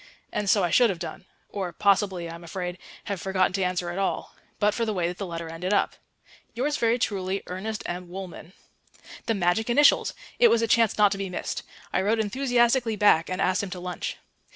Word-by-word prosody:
And 205 -1 -1
so 200 -1 +4
I 175 - +1
should 240 +4 +5
have 190 - -2
done 175 +2 -7 0.2
or 190 -3 -4
possibly, 190 -2 +1
I 165 - -7
am 170 +1 -10
afraid, 180 +1 -5 0.2
have 200 -4 -4
forgotten 185 -1 +1
to 195 - -1
answer 180 -1 -1
at 180 - -4
all 195 - -2 0.2
but 210 0 +2
for 235 - -1
the 215 -2 -1
way 175 -2 +1
that 175 +1 -5
the 200 - -3
letter 170 -1 -5
ended 170 +4 -3
up. - - +1 0.6
"Yours 285 +5 0
very 230 -2 +2
truly, 195 -4 -1
ERNEST 205 +4 -5
M. 175 0 -5
WOOLMAN." 185 -2 -8 0.7
The 225 - +2
magic 195 +5 +1
initials! 290 +5 +4 0.2
It 485 - +8
was 230 0 +3
a - - +2
chance 225 -1 +3
not 205 -1 +5
to 195 - -2
be 195 -1 -3
missed. 180 - -4 0.3
I - - +2
wrote 210 +4 +2
enthusiastically 240 +1 +2
back 205 -6 +4
and 185 0 -3
asked 185 -1 +2
him 200 - -4
to 180 0 -6
lunch. 180 0 -4
195 Hz, 215 wpm, -26 LUFS, 180-220 Hz, 0.7 s, It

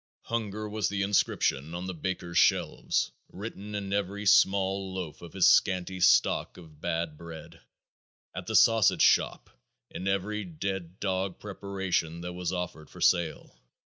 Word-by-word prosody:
Hunger 110 -2 -3
was 105 -3 -1
the 100 -1 -1
inscription 85 -6 +1
on 90 +1 -4
the 95 - -4
baker's 85 0 -2
shelves, - - +2 0.2
written 105 +1 -7
in 100 -1 -3
every 100 +1 -2
small 95 0 +3
loaf 90 -5 -6
of 85 - -11
his 95 -2 +3
scanty 95 -1 +3
stock 90 - +3
of 80 -4 -15
bad 80 -3 -2
bread; 85 -2 -10 0.7
at - - -6
the - - -2
sausage 115 -3 +5
shop, - - +2 0.4
in 95 - -5
every 100 +2 -1
dead 95 +1 -5
dog 95 -1 -2
preparation 95 -5 -3
that 90 0 -5
was 90 -1 -3
offered 90 -4 -5
for - - -13
sale. 85 -3 +1
95 Hz, 145 wpm, -28 LUFS, 85-100 Hz, 0.7 s, sausage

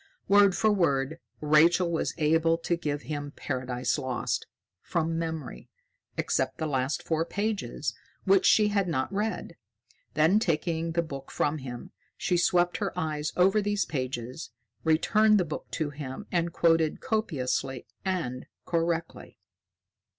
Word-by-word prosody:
Word 200 -2 +6
for 220 - +3
word, 160 -5 +1 0.2
Rachael 165 +4 +4
was 165 - -1
able 165 +1 +3
to 170 +1 -1
give 150 -3 -3
him 145 -1 -5
"Paradise 130 0 -2
Lost" 130 -3 -2 0.3
from 165 -1 -1
memory, 160 -5 -5 0.5
except 130 0 0
the 160 - -2
last 135 -1 -1
four 160 0 0
pages, 185 - -2 0.3
which 195 -1 +4
she 210 -1 +5
had 200 -2 +1
not 145 +2 -1
read. 210 -4 -2 0.6
Then, 160 +7 +4
taking 165 -3 -1
the 170 0 +1
book 140 -4 -8
from 150 +1 0
him, 125 -3 -8 0.3
she 180 - 0
swept 175 0 +3
her - - -3
eyes 155 -1 -2
over 195 +4 +4
these 205 0 0
pages, 130 -3 -4 0.3
returned 210 +7 +4
the 180 - +1
book 150 - -6
to 155 -2 -1
him, 140 +5 -7
and 170 -1 +1
quoted 165 -2 +2
copiously 135 - -1 0.2
and 165 -10 -2 0.2
correctly. 165 -1 -2
160 Hz, 135 wpm, -28 LUFS, 145-180 Hz, 0.6 s, Word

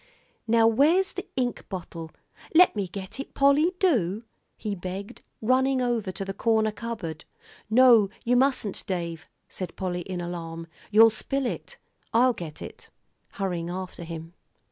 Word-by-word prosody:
"Now 225 0 +4
where's 305 - +4
the 370 - -6
ink 250 -2 -1
bottle? 170 -4 -6 0.5
Let 360 -5 +7
me 200 -3 -1
get 190 +6 -8
it, 275 - -7
Polly, 285 +6 +4
do," 225 - +1 0.3
he 210 - -3
begged, 190 +2 -6 0.2
running 260 +3 +3
over 235 -6 0
to 195 - -5
the 195 - -4
corner 220 +1 +2
cupboard. 210 -9 -6 0.5
"No, 230 -3 +6 0.2
you 245 +1 +3
mustn't, 255 -6 +1
Dave," 170 -3 -4 0.2
said 185 - -6
Polly 180 -2 -3
in 180 0 -5
alarm, 165 -1 -5 0.2
"you'll 225 +2 +7
spill 270 +5 -2
it. - - -5 0.4
I'll 250 +2 +5
get 160 -7 -8
it," - - -11 0.4
hurrying 175 -4 -2
after 185 -1 -6
him. 165 0 -8
210 Hz, 145 wpm, -26 LUFS, 180-250 Hz, 0.5 s, Let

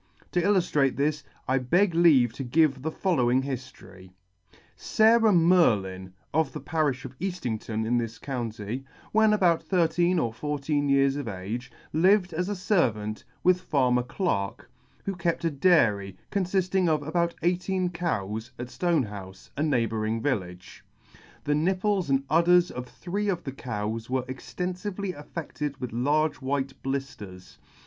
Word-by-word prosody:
To 175 - +1
illuftrate 170 -8 +2
this, 150 +1 0 0.2
I 130 +1 +2
beg 175 +9 +2
leave 150 -9 +5
to 135 - -5
give 140 +1 +2
the 160 - -2
following 130 -8 +1
hiftory: 100 -9 -8 0.7
SARAH 225 0 +4
MERLIN, 105 - +3 0.2
of 155 -3 +1
the - - -5
parifh 145 -3 -1
of 130 0 -9
Eaftington 120 - -3
in 120 +2 +2
this 115 -1 -4
county, 120 -2 -4 0.3
when 220 0 +4
about 180 -6 +3
thirteen 175 +1 +2
or 115 -8 0
fourteen 145 +2 -1
years 140 0 +3
of 145 -4 -4
age, 110 +6 -5 0.2
lived 185 +3 +3
as 180 +4 -1
a - - 0
fervant 115 - 0 0.2
with 180 0 +4
farmer 125 -7 +2
Clarke, 120 - -3 0.3
who 195 - -1
kept 170 -1 -1
a 165 - +2
dairy, 110 - +2
confifting 185 -2 +1
of 155 -2 +1
about 170 +3 0
eighteen 180 +1 0
cows, 110 - -3
at 125 0 -6
Stonehoufe, 105 - -2
a 145 - -3
neighbouring 115 -6 0
village. 90 -9 -4 0.6
The 145 - +1
nipples 185 +3 +1
and 135 0 +2
udders 175 +3 +4
of 125 0 -6
three 200 +8 -3
of 175 -3 -1
the 135 - -4
cows 115 -3 -4
were 130 0 0
extenfively 180 +8 -4
affedted 150 -2 -6
with 125 -2 -4
large 145 +5 +1
white 135 0 -1
blifters. 135 -9 -6
145 Hz, 140 wpm, -27 LUFS, 120-175 Hz, 0.7 s, leave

